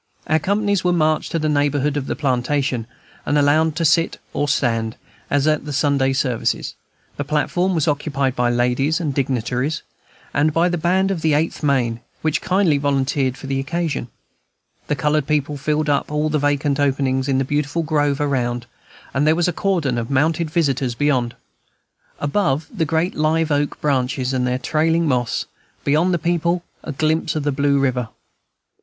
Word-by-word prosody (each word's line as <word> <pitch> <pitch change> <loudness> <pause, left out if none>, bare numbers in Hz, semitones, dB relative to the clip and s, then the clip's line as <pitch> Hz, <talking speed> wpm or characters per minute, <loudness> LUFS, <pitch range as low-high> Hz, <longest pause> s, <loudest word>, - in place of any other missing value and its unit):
Our 155 +1 +2
companies 200 +2 0
were 180 - +2
marched 155 -2 +1
to - - 0
the 155 -1 0
neighborhood 145 -1 +1
of 140 -2 -2
the - - -2
platform, 130 -2 0 0.4
and 145 - +1
allowed 150 +2 +3
to 165 0 0
sit 165 +2 +3 0.2
or 145 - 0
stand, 115 -5 0 0.3
as 145 0 +2
at 155 -1 +2
the 150 - -5
Sunday 140 -1 +2
services; 130 -3 -1 0.4
the 145 - -1
platform 175 +6 0
was 160 -2 +1
occupied 140 -3 0
by 120 0 +1
ladies 125 +6 +1
and 155 -5 -2
dignitaries, 130 +2 -1 0.5
and 150 +2 +2
by 170 +3 +3
the 175 - -1
band 190 +4 +2
of 180 -4 -2
the 155 -2 +2
Eighth 160 +2 -1
Maine, 125 -6 +1 0.2
which 155 -1 +1
kindly 185 -6 +2
volunteered 135 -1 0
for - - -10
the 135 0 -1
occasion; 160 -2 -2 0.8
the 150 - 0
colored 150 +1 0
people 150 0 0
filled 150 +2 -1
up 145 -1 +1
all 150 +1 0
the 150 0 +1
vacant 145 0 +1
openings 135 -1 +1
in 135 -1 +1
the 135 - +1
beautiful 145 +4 -1
grove 145 -3 +1
around, 125 -4 -1 0.5
and 145 +3 +1
there 155 - +5
was 175 +1 +1
a 175 - 0
cordon 160 -11 0
of 115 - -4
mounted 155 +4 +1
visitors 135 -7 0
beyond. 130 -4 +1 0.8
Above, 145 -1 0
the 175 -7 0
great 165 +4 0
live 155 +1 +1
oak 145 0 0
branches 130 -2 0
and 125 -1 0
their 125 0 0
trailing 160 +4 +1
moss; 125 -4 0 0.4
beyond 155 +6 +2
the 175 - +2
people, 170 +1 0 0.2
a - - -5
glimpse 155 +3 0
of 155 - -1
the 145 - +1
blue 140 +1 +2
river. 125 -4 0
145 Hz, 175 wpm, -20 LUFS, 135-160 Hz, 0.8 s, there